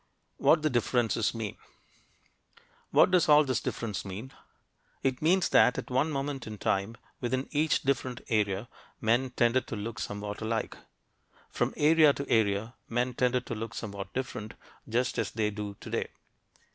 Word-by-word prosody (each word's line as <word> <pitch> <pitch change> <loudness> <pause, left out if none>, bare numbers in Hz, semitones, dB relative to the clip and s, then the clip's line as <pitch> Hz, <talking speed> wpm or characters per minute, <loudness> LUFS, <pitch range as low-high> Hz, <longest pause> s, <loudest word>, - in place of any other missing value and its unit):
WHAT 155 -1 +4
THE 155 - +3
DIFFERENCES 120 -2 +1
MEAN 110 -3 -4 1.3
What - - +5
does 180 -4 +4
all 150 0 +8
this 130 -4 0
difference 110 -4 -3
mean? 105 +7 -7 0.7
It 130 -1 0
means 175 +4 +3
that, 125 - +5
at - - -5
one 130 +5 +2
moment 140 -3 -3
in 110 -1 -6
time, 100 +4 -1 0.2
within 130 +2 -1
each 155 +1 +1
different 130 -2 -1
area, 105 -1 0 0.3
men 120 +4 +2
tended 125 +1 +2
to - - -4
look 105 0 -5
somewhat 105 +1 -5
alike. 110 +1 -2 0.8
From - - 0
area 155 -1 +6
to 140 - -5
area, 110 +1 +1 0.2
men 125 +2 0
tended 125 0 +1
to - - -4
look 110 -1 -5
somewhat 100 -2 -6
different, 110 -6 -5 0.3
just 120 +3 0
as - - 0
they 110 -1 -1
do 105 -1 -5
today. - - -3
120 Hz, 155 wpm, -29 LUFS, 105-130 Hz, 1.3 s, all